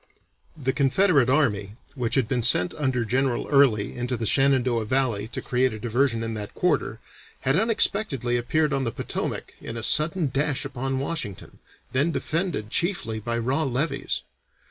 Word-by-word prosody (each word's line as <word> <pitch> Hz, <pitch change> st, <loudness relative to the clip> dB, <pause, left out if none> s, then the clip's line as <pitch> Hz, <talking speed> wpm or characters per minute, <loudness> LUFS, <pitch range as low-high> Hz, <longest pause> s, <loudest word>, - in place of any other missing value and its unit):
The 130 Hz, -3 st, -1 dB
Confederate 145 Hz, -1 st, +3 dB
Army 105 Hz, -8 st, +1 dB, 0.2 s
which 125 Hz, -4 st, -1 dB
had 130 Hz, -5 st, +2 dB
been 125 Hz, -1 st, 0 dB
sent 90 Hz, -6 st, +3 dB
under 130 Hz, -5 st, -1 dB
General 130 Hz, +2 st, 0 dB
Early 130 Hz, -8 st, +3 dB
into 125 Hz, 0 st, -2 dB
the 115 Hz, -, -3 dB
Shenandoah 130 Hz, -2 st, +2 dB
Valley 115 Hz, -4 st, +1 dB
to -, -, -6 dB
create 130 Hz, -1 st, +1 dB
a 110 Hz, -, -7 dB
diversion 120 Hz, +1 st, 0 dB
in 115 Hz, 0 st, -3 dB
that 105 Hz, -2 st, -6 dB
quarter, -, -, 0 dB, 0.4 s
had 135 Hz, -, +1 dB
unexpectedly 195 Hz, -, +1 dB
appeared 150 Hz, +5 st, +1 dB
on 135 Hz, -1 st, 0 dB
the 115 Hz, -, -1 dB
Potomac -, -, -4 dB
in 115 Hz, -, -6 dB
a 115 Hz, -, -5 dB
sudden 155 Hz, +2 st, +2 dB
dash 145 Hz, 0 st, 0 dB
upon 135 Hz, 0 st, -3 dB
Washington, 135 Hz, -, -4 dB, 0.3 s
then 140 Hz, +6 st, +2 dB
defended 160 Hz, -, -2 dB
chiefly 170 Hz, -, 0 dB
by 115 Hz, +2 st, -3 dB
raw 130 Hz, +7 st, 0 dB
levies. 135 Hz, 0 st, -1 dB
130 Hz, 160 wpm, -25 LUFS, 115-140 Hz, 0.4 s, Confederate